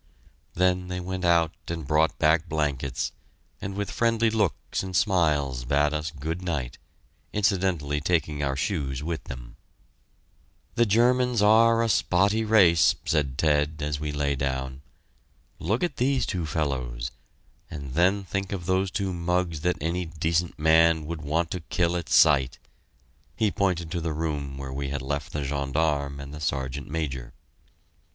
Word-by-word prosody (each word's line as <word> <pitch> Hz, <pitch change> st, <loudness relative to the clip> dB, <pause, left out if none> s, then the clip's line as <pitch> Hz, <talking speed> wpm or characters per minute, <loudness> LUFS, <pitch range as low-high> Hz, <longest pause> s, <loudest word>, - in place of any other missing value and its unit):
Then 90 Hz, 0 st, +2 dB
they 90 Hz, 0 st, -4 dB
went 95 Hz, +1 st, -4 dB
out 85 Hz, -2 st, +3 dB
and 85 Hz, -2 st, -4 dB
brought 75 Hz, +1 st, +2 dB
back 80 Hz, +2 st, +2 dB
blankets, 70 Hz, -4 st, -1 dB, 0.5 s
and 95 Hz, 0 st, -5 dB
with 100 Hz, 0 st, -3 dB
friendly 115 Hz, -1 st, +2 dB
looks 105 Hz, -6 st, -1 dB
and 95 Hz, -1 st, -6 dB
smiles 75 Hz, -, +1 dB
bade 75 Hz, +4 st, +2 dB
us 75 Hz, 0 st, -2 dB
good 80 Hz, +4 st, -5 dB
night, 75 Hz, -9 st, -3 dB, 0.5 s
incidentally 90 Hz, -8 st, 0 dB
taking 75 Hz, -2 st, 0 dB
our 70 Hz, -1 st, 0 dB
shoes 70 Hz, -3 st, -2 dB
with 80 Hz, 0 st, -4 dB
them. -, -, -9 dB, 1.2 s
"The 120 Hz, -1 st, +2 dB
Germans 120 Hz, +1 st, +3 dB
are 115 Hz, +2 st, +5 dB
a -, -, +1 dB
spotty 100 Hz, +1 st, +2 dB
race," 95 Hz, -7 st, +5 dB
said 70 Hz, -4 st, 0 dB
Ted, 75 Hz, 0 st, +1 dB
as 75 Hz, -1 st, -2 dB
we 75 Hz, 0 st, -3 dB
lay 70 Hz, -1 st, 0 dB
down. 65 Hz, 0 st, -3 dB, 0.8 s
"Look 105 Hz, -, -1 dB
at 175 Hz, -6 st, -1 dB
these 130 Hz, +1 st, +1 dB
two 85 Hz, -4 st, -3 dB
fellows 65 Hz, -6 st, -2 dB, 0.6 s
and 70 Hz, -4 st, -7 dB
then 95 Hz, +5 st, +3 dB
think 95 Hz, +1 st, -3 dB
of 95 Hz, -4 st, -4 dB
those 95 Hz, +1 st, +1 dB
two 95 Hz, 0 st, -2 dB
mugs 85 Hz, -2 st, -1 dB
that 90 Hz, +1 st, 0 dB
any 85 Hz, +4 st, -2 dB
decent 80 Hz, +1 st, -1 dB
man 80 Hz, 0 st, +4 dB
would 80 Hz, 0 st, -5 dB
want 80 Hz, +3 st, -1 dB
to 90 Hz, -, -2 dB
kill 85 Hz, +1 st, 0 dB
at 85 Hz, -2 st, -4 dB
sight!" 70 Hz, -4 st, +4 dB, 0.8 s
He 110 Hz, -3 st, +1 dB
pointed 90 Hz, -4 st, -1 dB
to 85 Hz, -2 st, -2 dB
the 80 Hz, -1 st, -2 dB
room 75 Hz, -3 st, -3 dB
where 65 Hz, -1 st, -6 dB
we 70 Hz, 0 st, -3 dB
had 70 Hz, -2 st, -3 dB
left 70 Hz, +2 st, -3 dB
the 75 Hz, -, -3 dB
gendarme 70 Hz, 0 st, -1 dB
and 70 Hz, +1 st, -8 dB
the 75 Hz, -, -8 dB
Sergeant 70 Hz, -2 st, -3 dB
Major. 70 Hz, -6 st, -4 dB
80 Hz, 155 wpm, -26 LUFS, 70-90 Hz, 1.2 s, are